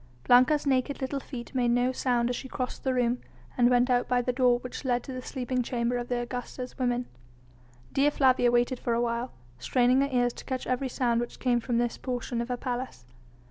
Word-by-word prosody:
Blanca's 255 +5 +5
naked 270 +1 +1
little 270 +1 -2
feet 250 -2 -8
made 250 -2 +1
no 245 +1 +2
sound 245 -2 +1
as - - -2
she 265 - -6
crossed 255 -1 -4
the 265 - +1
room, 245 0 +1 0.3
and 240 -1 +4
went 245 0 +4
out 245 -1 +2
by 250 0 +2
the 245 +1 -1
door 250 -1 +4
which 250 +3 -7
led 245 -2 0
to 265 - -7
the 255 - -5
sleeping 255 -1 -2
chamber 240 0 -1
of 240 0 -3
the 245 - -1
Augusta's 250 +1 -5
women. 245 -1 0 0.9
Dea 280 +2 +4
Flavia 260 -4 +3
waited 240 +1 +1
for 235 - -1
a 235 - +1
while, 235 +1 -1 0.3
straining 250 - +3
her 280 - +1
ears 245 -1 +2
to - - -10
catch 260 -1 -3
every 255 +1 -1
sound 240 -2 +1
which 240 - -6
came 245 -2 +2
from 240 0 -1
this 240 0 -1
portion 245 -1 -3
of 235 - -4
her 250 - -1
palace. 245 - -5
245 Hz, 220 wpm, -28 LUFS, 240-255 Hz, 0.9 s, Blanca's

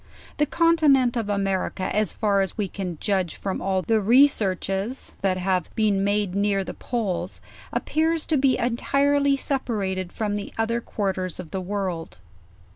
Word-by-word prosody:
The 295 - +2
continent 300 -8 +3
of 225 -3 -2
America 195 -1 -1
as 215 0 +2
far 200 -2 +1
as 190 - -3
we 205 -2 0
can 185 -3 -5
judge 190 -5 0
from 195 -2 -4
all 190 0 0
the 220 +1 +2
researches 210 -2 +2
that 190 -1 +1
have 185 -2 0
been 205 -3 +2
made 200 -2 0
near 200 0 +1
the - - -6
poles, 195 -7 -3 0.3
ap - - -2
pears 320 0 +1
to 310 - +1
be 265 -1 +3
entirely 280 +4 +2
separated 205 -10 -2
from 210 -2 -2
the 205 - -6
other 230 +1 0
quarters 190 -5 -3
of 175 -4 -8
the 190 - -3
world. 180 - -4
205 Hz, 160 wpm, -24 LUFS, 190-245 Hz, 0.3 s, continent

